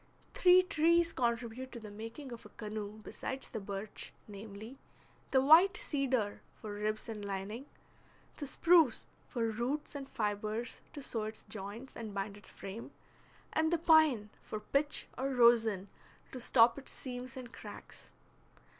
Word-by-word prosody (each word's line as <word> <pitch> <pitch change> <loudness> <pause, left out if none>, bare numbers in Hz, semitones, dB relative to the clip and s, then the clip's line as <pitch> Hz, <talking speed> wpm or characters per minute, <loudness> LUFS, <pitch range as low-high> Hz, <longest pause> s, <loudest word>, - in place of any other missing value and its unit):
Three 365 0 +7
trees 340 -2 +3
contribute 240 +1 -1
to 235 - -6
the 215 -2 -9
making 225 +6 -8
of 235 - -8
a - - -12
canoe 215 -1 -6
besides 265 +4 -5
the 225 - -4
birch, 200 +1 -6 0.2
namely, 215 +4 -9 0.5
the 265 - +4
white 330 +7 +7
cedar 260 -8 -1
for 210 -1 -7
ribs 215 +1 -2
and 215 -2 -5
lining, 200 +6 -4 0.7
the 290 - -4
spruce 330 -3 +4 0.2
for 235 -2 -1
roots 245 +7 -2
and 275 -2 -6
fibres 215 +2 -2
to 285 - -7
sew 225 -4 -2
its 215 0 -6
joints 215 +5 -7
and 220 -3 -6
bind 200 +1 -3
its 205 - -8
frame, 200 +4 -7 0.6
and 320 0 +2
the 340 - +4
pine 310 -10 +5
for 215 - -5
pitch 280 +7 0
or 270 +1 0
rosin 225 -5 +5 0.4
to 260 - -6
stop 235 +1 +5
its 270 - -7
seams 250 -1 -6
and 250 -2 -8
cracks. - - -9
235 Hz, 150 wpm, -34 LUFS, 215-275 Hz, 0.7 s, Three